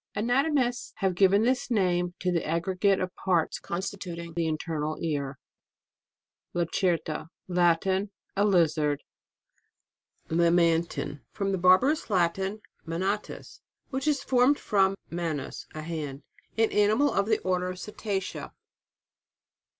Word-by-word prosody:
Anatomists 245 +3 +1
have 190 -2 0
given 195 +3 +4
this 260 +3 +1
name 180 -5 +1
to 180 - +1
the 170 -2 0
aggregate 185 +4 +1
of 185 -1 -3
parts, 175 -4 0
constituting 170 -2 -5
the 165 -1 0
internal 155 -1 -2
ear. 140 -4 -2 1.2
LACERTA. 170 -2 0 0.2
Latin. 180 +2 +2 0.3
A 200 - +2
lizard. 155 -7 +2 1.2
LAMANTIN. 170 -3 +2
From 195 -1 -1
the 190 - -1
Barbarous 190 - +4
Lat 180 -2 +2
in, 195 +3 -3 0.2
manalus, 190 +6 -3 0.3
which 270 +2 -2
is 290 -3 +1
formed 260 +2 +4
from 195 -1 +2 0.2
manus, 165 -5 -4
a 155 - -5
hand. 150 -4 -5 0.3
An 225 0 +3
animal 215 +8 +3
of 200 +1 +1
the 220 -1 +3
Order 180 0 0
of 185 - -6
Cetacea. 195 -1 -4
185 Hz, 120 wpm, -28 LUFS, 170-205 Hz, 1.2 s, given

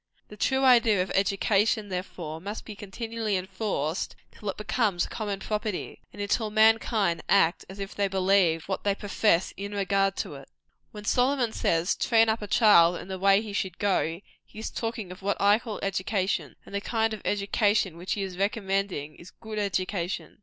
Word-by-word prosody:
The 210 - -10
true 265 +5 +1
idea 230 -7 +5
of 185 - -7
education, 200 +2 +1
therefore, 175 -4 -5
must 205 +4 -6
be 215 - -8
continually 220 +1 -3
enforced, 185 -4 -3 0.2
till 210 - -6
it 190 - -4
becomes 210 -4 0
common 205 -4 -4
property, 210 -2 -3
and - - -13
until 210 +2 0
mankind 220 -4 +3
act 165 +2 +3
as 190 - -9
if 195 0 -6
they 200 -1 0
believed 185 -4 +2
what 190 - -3
they 200 -1 +1
profess 200 -3 +1
in 200 +1 -5
regard 195 -1 +1
to - - -4
it. - - -11 0.4
When 210 -1 -10
Solomon 250 -1 +2
says, 165 +2 +1
"Train 225 -1 +3
up 220 0 0
a 210 - -5
child 180 -7 +6
in 180 - -8
the 190 -1 -4
way 195 +2 +4
he 210 -2 -7
should 190 -3 -2
go," 185 -4 0 0.2
he - - -18
is 220 - -5
talking 225 -5 -4
of 180 - -10
what 200 +1 -1
I 205 +2 +5
call 225 -3 -6
education; 195 0 -1
and - - -13
the 200 - -1
kind 225 0 0
of 215 - -6
education 205 -2 +1
which 175 +2 -3
he 200 - -2
is 190 -1 -5
there 195 - +3
recommending, 195 -7 -2
is 175 - -12
good 220 -1 -7
education. 185 -2 -2
200 Hz, 190 wpm, -27 LUFS, 190-215 Hz, 0.4 s, child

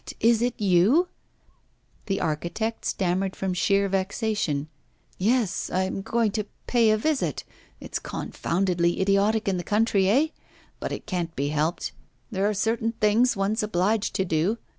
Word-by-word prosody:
'What! - - -9
is 230 0 +4
it 245 0 -1
you?' 210 - +4 1.0
The 195 -1 0
architect 170 +9 -2
stammered 190 +1 0
from 190 -1 -2
sheer 200 +3 +2
vexation: 190 -6 -1 0.5
'Yes, 220 0 +1
I 185 - +1
am 190 +1 -3
going 225 +1 +1
to 215 0 -2 0.2
pay 235 -3 +3
a 215 - +4
visit. 300 +5 -1 0.4
It's - - -4
confoundedly 175 -1 -1
idiotic 200 +3 +2
in 190 -2 +1
the 175 - -3
country, 205 -2 +2
eh? 275 +9 +4 0.5
But - - -4
it - - -5
can't 175 -5 -3
be 140 +1 -1
helped. 155 +3 -1 0.4
There 200 0 +1
are - - 0
certain 225 +2 0
things 225 +2 +3
one's 200 +3 0
obliged 210 +1 0
to 190 - +1
do. 170 +6 +1
200 Hz, 155 wpm, -25 LUFS, 180-225 Hz, 1.0 s, is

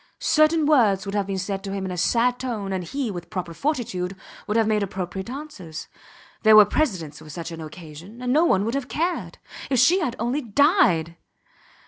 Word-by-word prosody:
Certain 310 0 +3
words 220 -10 +3
would 195 - -5
have 200 -2 -1
been 195 -1 -2
said 195 +1 -3
to 195 - -5
him 195 -1 -3
in 185 - -4
a - - -4
sad 245 +6 +2
tone, 215 -7 -3
and 185 -2 -3
he, 270 +1 -3
with 175 -2 -8
proper 180 -4 -5
fortitude, 195 - -2 0.3
would 210 - 0
have 225 - +3
made 215 -1 +1
appropriate 190 +1 -4
answers. 250 - -8 0.5
There 220 -1 +6
were 210 -1 +10
precedents 185 - -1
for 155 - -13
such 165 +2 -6
an 165 -1 -7
occasion. 160 +6 -11
And 250 0 -1
no 310 +3 +4
one 200 - +2
would 230 - -2
have 275 -2 -2
cared. 340 +5 -2 0.3
If 260 - +1
she 355 +10 +5
had 255 -9 -2
only 245 +6 -1
died! 230 - +2
210 Hz, 200 wpm, -24 LUFS, 185-260 Hz, 0.5 s, were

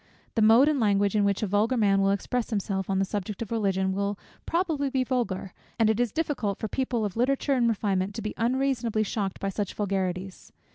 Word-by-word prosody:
The 225 - +1
mode 225 +6 +6
and 300 -2 +2
language, 205 -2 +2
in 210 - +3
which 200 +1 +1
a - - +3
vulgar 210 +5 +1
man 200 -3 +3
will 195 - +3
express 220 +4 -1
himself 200 -3 -2
on 195 - +1
the 195 - +2
subject 205 +2 -4
of 225 - -11
Religion, 190 -4 +1
will 200 +1 -1 0.3
probably 325 -5 0
be 260 -1 +1
vulgar, 230 -8 -2 0.2
and 225 -2 +4
it 220 - -2
is 245 -3 +1
difficult 270 - -1
for 220 - -3
people 245 -1 -1
of 200 - -4
literature 275 +4 +1
and 240 -3 +3
refinement 195 -3 0
not - - -13
to 225 - -4
be 215 - -3
unreasonably 240 -2 0
shocked 200 -2 -3
by 195 - -2
such 200 0 -3
vulgarities. 190 -2 -3
215 Hz, 220 wpm, -27 LUFS, 195-245 Hz, 0.3 s, mode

